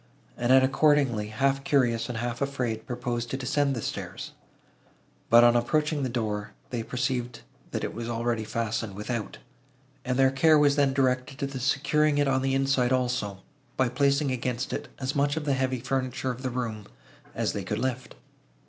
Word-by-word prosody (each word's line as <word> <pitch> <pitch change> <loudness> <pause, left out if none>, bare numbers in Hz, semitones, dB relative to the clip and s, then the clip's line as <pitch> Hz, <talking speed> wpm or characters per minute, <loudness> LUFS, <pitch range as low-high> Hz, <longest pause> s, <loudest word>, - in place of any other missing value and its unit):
Annette 130 +2 +4
accordingly, 135 -5 +3
half 135 +5 0
curious 120 -5 +1
and 120 - -3
half 120 +2 -3
afraid, 125 -5 -2
proposed 120 -2 -3
to 135 - -2
descend 135 +1 0
the 115 - -4
stairs; - - -5 1.0
but, 120 +1 +8
on 120 0 +6
approaching 150 +5 +1
the 130 - -1
door, 105 -3 -3 0.2
they 120 -2 -2
perceived, 125 - -2 0.3
that - - -3
it - - -3
was 115 +1 -5
already 115 -1 -1
fastened 115 -2 -3
without, 110 +1 -4 0.7
and 125 -1 -1
their 135 0 +5
care 155 +3 +5
was 145 -1 +4
then 140 -2 +3
directed 130 0 0
to 140 - -2
the 135 -1 -5
securing 145 +3 +2
it 145 -1 +2
on 135 -1 +2
the 135 0 +1
inside 135 -2 +2
also, 125 -6 -1 0.3
by 130 -2 +2
placing 140 +2 +2
against 125 0 -2
it - - -4
as 130 0 -3
much 145 +1 +1
of 155 - -3
the 140 - +2
heavy 130 -1 0
furniture 130 +1 -2
of 125 +1 -8
the 130 - -2
room, 115 -4 -4 0.5
as - - -1
they - - -3
could - - -3
lift. 130 0 -3
130 Hz, 180 wpm, -27 LUFS, 120-135 Hz, 1.0 s, but